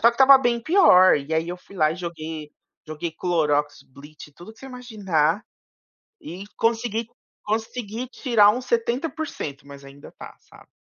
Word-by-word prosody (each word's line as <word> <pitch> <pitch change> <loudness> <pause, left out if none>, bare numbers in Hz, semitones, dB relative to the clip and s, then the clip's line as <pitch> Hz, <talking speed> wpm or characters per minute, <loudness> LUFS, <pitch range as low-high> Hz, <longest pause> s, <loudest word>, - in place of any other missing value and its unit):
só 235 - +6
que - - -12
estava 270 +2 +7
bem 240 -2 0
pior 230 - +5
e, 145 +2 -6
aí, 160 +1 0
eu 180 - -5
fui 195 +2 -17
lá 155 -3 +2
e 165 - -8
joguei 160 -3 -7 0.4
joguei 155 +1 -5
clorox, 150 -4 -1
lit, 150 +1 -13
tudo 175 +7 -13
que 225 - -25
você 270 - -11
imaginar 210 - -1 0.8
e 180 +4 -9
consegui 230 -1 -1 0.4
consegui 225 +2 -4
tirar 230 -7 +3
uns 250 +4 -2
70%, 235 - -3
mas 140 0 -12
ainda 140 +1 -14
tá, - - -11
sabe? - - -19
190 Hz, 160 wpm, -23 LUFS, 155-235 Hz, 0.8 s, estava